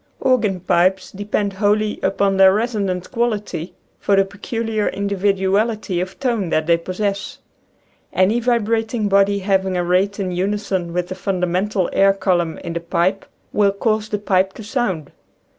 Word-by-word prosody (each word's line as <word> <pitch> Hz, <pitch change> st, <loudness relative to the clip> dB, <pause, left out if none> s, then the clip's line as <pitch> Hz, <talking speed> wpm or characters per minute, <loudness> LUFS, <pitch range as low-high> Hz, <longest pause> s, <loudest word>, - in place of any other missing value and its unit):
Organ 215 Hz, -8 st, +1 dB
pipes 185 Hz, +2 st, +1 dB
depend 205 Hz, 0 st, -2 dB
wholly 210 Hz, +2 st, +1 dB
upon 195 Hz, +1 st, +1 dB
their 190 Hz, 0 st, +7 dB
reso 220 Hz, +1 st, 0 dB
nant 185 Hz, -2 st, -3 dB
quality 210 Hz, -7 st, -2 dB, 0.2 s
for 200 Hz, -, +2 dB
the 195 Hz, 0 st, +4 dB
peculiar 215 Hz, +2 st, -3 dB
individuality 200 Hz, 0 st, 0 dB
of 185 Hz, +1 st, -6 dB
tone 235 Hz, -9 st, -1 dB
that 155 Hz, -1 st, +1 dB
they 170 Hz, +1 st, +4 dB
possess. 195 Hz, +3 st, -3 dB, 0.7 s
Any 195 Hz, +5 st, +2 dB
vibrating 225 Hz, -2 st, 0 dB
body 200 Hz, 0 st, +3 dB
having 190 Hz, -1 st, 0 dB
a 175 Hz, -, 0 dB
rate 190 Hz, +4 st, +1 dB
in 190 Hz, -2 st, -2 dB
unison 190 Hz, -1 st, -2 dB
with 175 Hz, +1 st, -2 dB
the -, -, -3 dB
fundamental 185 Hz, 0 st, -1 dB
air 195 Hz, 0 st, +5 dB
column 180 Hz, -4 st, 0 dB
in 170 Hz, -, -4 dB
the 170 Hz, -, -2 dB
pipe 175 Hz, +3 st, -1 dB, 0.3 s
will 205 Hz, -1 st, +3 dB
cause 215 Hz, +1 st, -1 dB
the 210 Hz, -, -1 dB
pipe 190 Hz, -1 st, +1 dB
to 220 Hz, -, -10 dB
sound. 205 Hz, -, -2 dB
195 Hz, 155 wpm, -20 LUFS, 185-210 Hz, 0.7 s, their